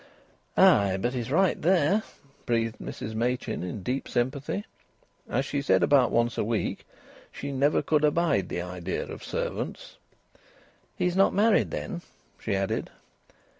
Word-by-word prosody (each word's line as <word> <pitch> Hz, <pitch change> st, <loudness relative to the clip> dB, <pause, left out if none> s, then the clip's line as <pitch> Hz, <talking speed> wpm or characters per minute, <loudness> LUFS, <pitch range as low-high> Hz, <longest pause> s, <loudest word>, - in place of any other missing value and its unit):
"Ay! 100 Hz, -2 st, +5 dB
But 120 Hz, +6 st, -1 dB
he's 120 Hz, -2 st, -3 dB
right 185 Hz, +5 st, +2 dB
there!" 180 Hz, +3 st, +3 dB, 0.5 s
breathed 115 Hz, -2 st, 0 dB
Mrs 110 Hz, -, -6 dB
Machin 120 Hz, +3 st, -1 dB
in 90 Hz, +2 st, -5 dB
deep 130 Hz, +5 st, -2 dB
sympathy. 135 Hz, -, -2 dB, 0.6 s
As 135 Hz, -, 0 dB
she 140 Hz, 0 st, -2 dB
said 140 Hz, -, +3 dB
about 135 Hz, -4 st, +5 dB
once 120 Hz, +1 st, +1 dB
a -, -, +2 dB
week, 110 Hz, 0 st, -2 dB, 0.4 s
"She 140 Hz, -, -6 dB
never 140 Hz, +2 st, +2 dB
could 155 Hz, -1 st, +2 dB
abide 150 Hz, -, +2 dB
the 85 Hz, -, -3 dB
idea 90 Hz, 0 st, -4 dB
of -, -, -9 dB
servants." -, -, -4 dB, 1.0 s
"He's 180 Hz, 0 st, 0 dB
not 195 Hz, +1 st, +4 dB
married, 215 Hz, +2 st, +4 dB
then?" 175 Hz, -5 st, -4 dB, 0.4 s
she 105 Hz, -, -1 dB
added. 95 Hz, 0 st, -1 dB
130 Hz, 140 wpm, -27 LUFS, 110-155 Hz, 1.0 s, Ay